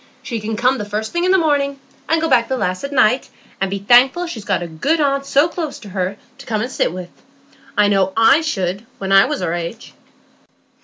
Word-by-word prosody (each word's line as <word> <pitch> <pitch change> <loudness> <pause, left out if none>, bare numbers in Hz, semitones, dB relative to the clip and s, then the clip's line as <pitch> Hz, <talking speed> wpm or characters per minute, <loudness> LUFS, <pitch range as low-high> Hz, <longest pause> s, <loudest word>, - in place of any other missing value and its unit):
She 230 - -4
can 215 +1 -4
come 255 +3 +2
the - - -3
first 210 +1 -4
thing 345 +1 0
in 370 - +3
the 380 - +5
morning, 285 -4 0 0.3
and 325 - +3
go 325 - 0
back 245 -5 +3
the 260 - -2
last 185 -3 -2
at 280 - -4
night, 250 -1 +2 0.3
and 195 - +1
be 200 - -2
thankful 250 - +4
she's 245 -12 -7
got 190 -4 -1
a - - -5
good 225 - -1
aunt 275 -1 0
so 285 +4 +3
close 330 -4 -5
to 210 - -12
her 190 +1 -3 0.2
to 275 - -11
come 215 -2 -1
and 245 +3 -3
sit - - 0
with. 180 0 -7 0.7
I 210 0 +5
know 195 -2 +2
I 225 +7 +5
should, 200 - -3
when 195 0 -4
I 195 0 +7
was 295 +1 -3
her 165 - -1
age." 175 +5 -6
230 Hz, 235 wpm, -18 LUFS, 195-280 Hz, 0.7 s, I